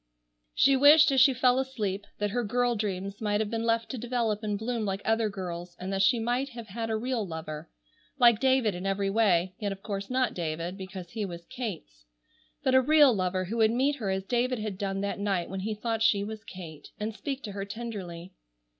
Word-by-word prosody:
She 275 - +5
wished 295 +3 +7
as 265 -2 +4
she 270 - +7
fell 255 0 +3
asleep 210 -7 -3
that 205 -1 -1
her 245 +2 0
girl 245 +3 +1
dreams 200 -1 -3
might 205 -1 +1
have 215 0 -1
been 225 -1 -1
left 230 0 +1
to 260 - -5
develop 230 -3 -1
and 210 -2 -2
bloom 230 +1 -2
like 195 -1 -2
other 225 -1 +2
girls', 175 -3 -6
and 190 +2 -4
that 195 - +1
she 195 +5 +4
might 245 +4 -1
have 235 -4 -9
had 225 +3 -4
a 220 - 0
real 245 0 -1
lover,—like 160 - -1
David 260 -5 +3
in 180 +2 -4
every 195 0 0
way, 190 -4 +2
yet 205 -2 -2
of 195 0 -8
course 200 -2 -4
not 255 0 +1
David 170 +1 -3
because 190 -2 -8
he 220 -2 -3
was 170 -3 -6
Kate's. 170 - -7 0.6
But 260 - +2
a 260 - +7
real 295 -1 +6
lover 185 -2 -1
who 220 +6 -4
would 220 -1 +5
meet 270 +5 +1
her 215 -7 -3
as 190 0 -1
David 245 +4 0
had 210 -3 -5
done 195 -1 -2
that 200 0 -3
night 195 -4 -1
when 190 - -3
he 215 +3 -3
thought 225 +1 -2
she 205 -2 +3
was 220 +1 -6
Kate, 165 -7 -10
and 210 +1 -3
speak 275 +3 -5
to 210 - -5
her 195 0 -4
tenderly. 195 -5 -7
210 Hz, 215 wpm, -28 LUFS, 190-240 Hz, 0.6 s, wished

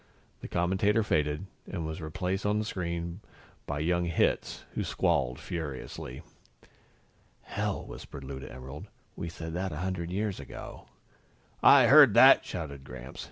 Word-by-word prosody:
The - - -7
commentator 95 +5 +2
faded, 75 -3 0 0.2
and 85 -5 -4
was 80 +2 -5
replaced 90 +5 -2
on 105 +1 +1
the 110 - -1
screen 85 -2 -4 0.5
by 75 0 -2
young 85 +2 +1
Hitz, 85 -1 0
who - - -1
squalled 65 -2 0
furiously. 70 -5 -6 1.2
"Hell!" - - -3
whispered 70 - -9
Lou 65 0 -6
to 65 - -9
Emerald. 65 +4 -9 0.3
"We 85 - -5
said 80 0 -7
that 95 +2 -2
a - - -5
hundred 90 -3 -3
years 100 0 -2
ago." 70 - -9 0.7
"I - - +8
heard - - +8
that!" - - +8
shouted 70 -3 -6
Gramps. 65 0 -10
85 Hz, 145 wpm, -29 LUFS, 70-95 Hz, 1.2 s, I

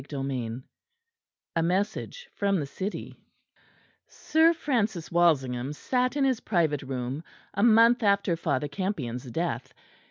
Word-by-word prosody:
CHAPTER 140 -3 -5
VII 125 -2 -3 0.9
A - - +3
MESSAGE 205 - -2
FROM 200 -2 +1
THE 145 - -2
CITY 190 +9 -5 0.9
Sir 320 +1 +3
Francis 220 - -1
Walsingham 140 -6 +2
sat 250 - 0
in 285 - +1
his 260 -4 +1
private 160 -8 +1
room 130 +2 -4 0.3
a 200 - -1
month 230 +2 +6
after 200 -4 +2
Father 150 -4 -1
Campion's 140 - -4
death. 130 -3 -3
170 Hz, 125 wpm, -27 LUFS, 135-215 Hz, 0.9 s, month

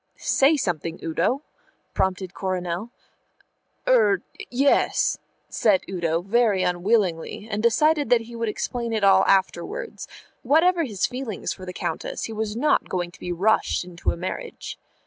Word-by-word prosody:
"Say 285 +3 +3
something, 170 - -2
Udo," 175 - 0 0.5
prompted 190 -1 -1
Coronel. 185 +2 -3 1.0
"Er 210 -7 +4 0.3
yes," 275 +3 +2 0.3
said 205 -4 +2
Udo, 170 -2 -1
very 205 -2 +2
unwillingly, 180 +1 0
and 205 - -1
deciding 290 +6 +3
he 235 +1 -10
would 230 -1 -1
explain 235 +2 -3
it 215 -2 -1
all 195 -1 +6
afterwards. 195 - 0 0.3
Whatever 335 +3 +3
his 205 -7 -1
feelings 250 -6 -4
for 185 - -11
the - - -4
Countess, - - -4
he 225 - -4
was 215 -1 -3
not 295 +5 +2
going 175 -1 -2
to - - -17
be 180 - -5
rushed 195 +4 +1
into 175 -1 -4
a - - -1
marriage. 325 - -6
210 Hz, 140 wpm, -24 LUFS, 180-245 Hz, 1.0 s, all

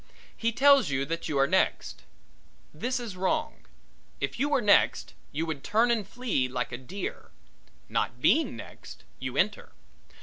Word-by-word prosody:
He 230 0 0
tells 280 - +5
you 135 0 0
that 165 +3 -4
you 145 - -1
are 135 - +5
next. 185 +6 0 0.7
This 255 +2 -2
is 230 -6 -6
wrong 185 0 -2 0.5
if - - -3
you 285 +3 +1
were 285 -2 +3
next 210 -4 +3 0.2
you 160 +3 -2
would 155 -4 -5
turn 225 +3 +3
and 220 -4 0
flee 225 - -1
like 125 -1 -3
a 120 - -4
deer. 180 +9 -6 0.6
Not - - -2
being 320 - +3
next, - - -11 0.2
you - - -5
enter. - - 0
200 Hz, 160 wpm, -28 LUFS, -, 0.7 s, tells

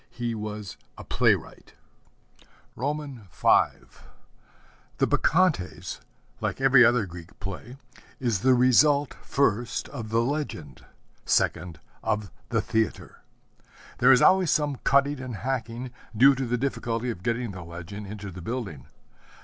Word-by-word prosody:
He 120 -1 -4
was 105 -2 -6 0.2
a - - -8
playwright. - - 0 1.0
V 145 0 -3 1.8
The - - +3
Bacchantes, 95 - +1 0.4
like 105 -5 -3
every 135 -2 +6
other 120 -2 +4
Greek 85 0 -12
play, 100 +6 -7 0.4
is 120 -7 0
the 130 +3 +4
result, 140 +3 +4
first, 120 -4 0
of 110 -2 -7
the 115 +1 +2
legend, 120 - -4 0.4
second, 85 -2 0 0.2
of 105 -4 -1 0.2
the - - +1
theatre. 110 -1 -2 0.8
There - - +6
is 125 - +6
always 185 -3 +5
some 145 -3 +1
cutting 140 +2 +2
and 130 -3 -6
hacking, 125 +1 -4 0.3
due 135 +5 +7
to 135 -1 -3
the 125 +1 0
difficulty 120 -2 -2
of 90 - -8
getting 115 +2 -2
the 95 -2 -8
legend 90 +5 -8
into 100 -1 -7
the 90 0 -9
building. 100 - -5
120 Hz, 125 wpm, -26 LUFS, 100-135 Hz, 1.8 s, due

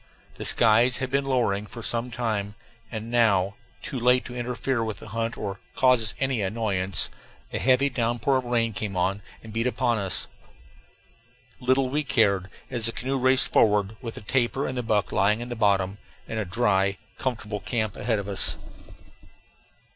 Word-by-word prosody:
The - - -7
skies 115 +2 +4
had 130 -1 -3
been 140 0 +1
lowering 110 -6 0
for 115 +2 -9
some 120 +2 -1
time, 110 -4 -2 0.4
and 110 0 -5
now 100 -5 +3 0.3
too 130 - -4
late 125 +1 +3
to 125 - -8
interfere 125 0 -1
with 110 -2 -4
the 110 - -11
hunt 115 +2 -2
or 100 -2 -5 0.2
cause 125 -2 +4
us 110 - 0
any 135 -4 0
annoyance 100 -2 +2 0.4
a - - -1
heavy 130 +2 +4
downpour 120 +1 0
of 130 - -3
rain 115 -2 0
came 100 -1 -4
on 95 +3 0 0.2
and 110 -1 -10
beat 115 +2 0
upon 120 -3 +1
us. 95 -3 -1 1.3
Little 130 +1 +2
we 150 +3 0
cared, 105 -8 +2 0.2
as 120 -3 0
the - - -1
canoe 135 +3 -2
raced 130 +1 +3
forward, 105 -1 +3
with 115 -3 -6
the - - -8
tapir 125 +4 0
and 130 - -3
the 125 - -1
buck 110 -4 0
lying 105 +3 +2
in 120 +1 -6
the 120 - -4
bottom, 100 -2 +1 0.3
and 110 - -3
a 105 - -2
dry, 95 -1 +1 0.2
comfortable 110 -5 -3
camp 110 -1 -2
ahead 110 +1 0
of 100 -1 -4
us. 100 -3 +2
115 Hz, 175 wpm, -25 LUFS, 105-125 Hz, 1.3 s, skies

